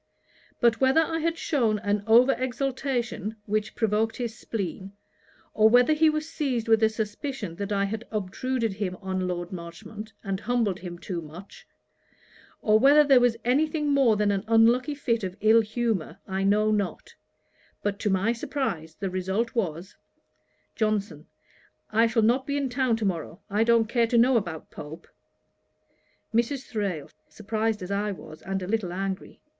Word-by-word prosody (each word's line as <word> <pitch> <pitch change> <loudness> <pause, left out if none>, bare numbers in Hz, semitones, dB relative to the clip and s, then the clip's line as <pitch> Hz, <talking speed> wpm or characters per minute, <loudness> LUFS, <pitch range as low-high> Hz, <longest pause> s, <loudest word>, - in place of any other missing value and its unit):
But 235 -1 +3
whether 265 +4 +5
I 325 0 -1
had 335 +1 -1
shewn 235 -11 +1
an 205 -1 -1
over 240 +4 +6
exultation, 255 -4 -2
which 215 +1 -2
provoked 220 0 +1
his 235 -2 -4
spleen; 195 -4 -5 0.6
or 220 0 +5
whether 245 +6 +5
he 315 +1 +4
was 305 0 -2
seized 265 -8 -2
with 225 0 +4
a 220 - +5
suspicion 220 - -4
that 200 0 -4
I 200 -1 +1
had 220 +3 -5
obtruded 225 +3 -2
him 190 -2 -3
on 185 -1 -2
Lord 175 0 -4
Marchmont, 200 +5 -8
and 195 -2 -2
humbled 225 -5 0
him 175 -1 -7
too 175 -1 -5
much; 165 +5 -12 1.0
or 215 0 +4
whether 285 +4 +7
there 275 -3 +6
was 245 -2 +2
any 275 +6 +3
thing 300 -1 -2
more 270 -6 +4
than 210 0 +2
an 195 -1 -1
unlucky 235 +5 +4
fit 235 -6 -1
of 185 0 -4
ill 220 +2 +5
humour, 220 -4 -2
I 190 0 -1
know 210 +2 +3
not; 205 -3 -2 0.7
but, 205 0 -1
to 210 - 0
my 195 +4 +2
surprize, 225 - -3
the 195 +1 -4
result 190 +5 -1
was, 185 -5 -3 0.8
JOHNSON. 215 -1 -1 0.6
'I 225 +2 +4
shall 225 -1 +1
not 250 +4 +2
be 285 0 -1
in 275 -2 -1
town 250 -2 +1
to 225 - -2
morrow. 170 -1 -3
I 210 +2 +3
don't 230 -1 +4
care 235 0 +2
to 235 - +1
know 245 +3 +5
about 175 -8 -2
Pope.' 160 +3 -10 1.2
MRS. 240 +4 0
THRALE: 195 -9 -3 0.2
(surprized 215 -1 -2
as 180 - -6
I 205 +1 0
was, 155 -5 -10
and 195 -1 -3
a - - -5
little 205 -4 -1
angry.) 190 +1 -4
220 Hz, 170 wpm, -26 LUFS, 195-245 Hz, 1.2 s, whether